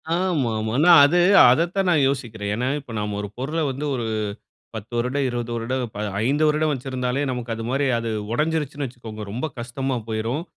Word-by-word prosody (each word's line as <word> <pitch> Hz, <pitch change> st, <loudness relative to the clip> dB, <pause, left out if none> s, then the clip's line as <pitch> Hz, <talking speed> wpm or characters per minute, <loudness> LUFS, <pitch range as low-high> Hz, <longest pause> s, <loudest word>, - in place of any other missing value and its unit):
ஆமா, 175 Hz, -9 st, 0 dB
ஆமா. 110 Hz, +1 st, -2 dB
ஆனா 155 Hz, +5 st, +4 dB, 0.2 s
அது 175 Hz, +5 st, +3 dB, 0.3 s
அதத்தான் 175 Hz, +6 st, +1 dB
நான் 155 Hz, -5 st, +3 dB
யோசிக்கிறேன். 110 Hz, -6 st, -4 dB
ஏன்னா 125 Hz, +3 st, -1 dB
இப்ப 130 Hz, -, -12 dB
நாம 105 Hz, -1 st, -3 dB
ஒரு 105 Hz, -, -5 dB
பொருள 150 Hz, +6 st, -2 dB
வந்து 140 Hz, +3 st, -4 dB
ஒரு 120 Hz, -, -3 dB, 0.7 s
10 110 Hz, +2 st, -8 dB
வருடம் 125 Hz, +4 st, 0 dB
20 120 Hz, -1 st, -4 dB
வருடம், 125 Hz, +3 st, -2 dB, 0.4 s
5 145 Hz, +4 st, +2 dB
வருடம் 155 Hz, 0 st, +2 dB
வச்சிருந்தாலே, 130 Hz, 0 st, -2 dB
நமக்கு 120 Hz, -2 st, -4 dB
அது 115 Hz, -, -6 dB
மாரி 135 Hz, +2 st, +1 dB
அது 115 Hz, 0 st, -3 dB, 0.2 s
உடஞ்சிருச்சுன்னு 150 Hz, 0 st, -1 dB
வச்சுக்கோங்க 115 Hz, -3 st, -9 dB
ரொம்ப 125 Hz, +8 st, -3 dB
கஷ்டமா 130 Hz, +2 st, -3 dB
போய்ரும். 115 Hz, +7 st, -2 dB
130 Hz, 170 wpm, -23 LUFS, 115-145 Hz, 0.7 s, ஆனா